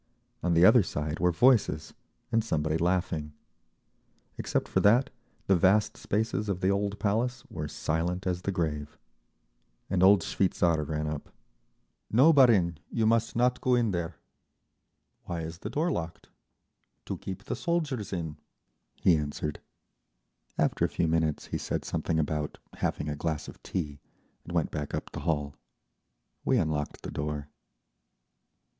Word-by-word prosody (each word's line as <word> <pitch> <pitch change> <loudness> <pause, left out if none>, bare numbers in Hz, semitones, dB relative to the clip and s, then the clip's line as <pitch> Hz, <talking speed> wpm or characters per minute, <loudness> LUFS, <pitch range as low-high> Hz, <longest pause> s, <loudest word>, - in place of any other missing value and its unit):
On 85 0 +1
the 85 +2 +7
other 120 +4 +8
side 75 -3 -3
were 90 0 +3
voices, 120 +7 +3 0.4
and 115 -1 +3
somebody 80 -6 0
laughing. 85 -3 0 1.0
Except - - -1
for - - +1
that 120 +6 +4 0.3
the 95 - +4
vast 95 +4 +3
spaces 105 0 -1
of 95 -2 -1
the 95 - +2
old 100 +1 0
Palace 120 +5 0
were 75 - -4
silent 80 +4 -2
as 90 -1 -1
the 100 - -1
grave. 75 -5 -3 0.9
An 95 - +2
old 95 0 +7
shveitzar 85 -5 +1
ran 75 0 -1
up. 75 -1 -4 0.8
"No, 135 +9 +6
barin, 100 - +5
you 115 - 0
must 115 +1 +2
not 125 +1 +2
go 125 -1 +3
in 115 -3 +2
there." 85 -2 -3 1.1
"Why 85 -2 -3
is 80 +1 -6
the 105 - -5
door 155 +9 0
locked?" 85 - -5 0.8
"To - - -3
keep 95 -2 -7
the - - -3
soldiers 155 - -1
in," 80 -5 -4 0.7
he 90 - +6
answered. 75 0 -3 1.0
After - - +1
a - - +3
few 85 - 0
minutes 80 -2 0
he - - 0
said - - -3
something 80 - -1
about 75 -1 -1 0.2
having - - -2
a 75 - -2
glass 80 0 -3
of - - -11
tea 75 -6 -4 0.5
and - - -8
went 85 -3 +1
back 75 -2 -3
up - - -5
the - - -6
hall. 75 -3 0 0.9
We 130 - +3
unlocked 80 -6 -1
the - - -5
door. 75 -1 -4
90 Hz, 150 wpm, -29 LUFS, 75-105 Hz, 1.1 s, other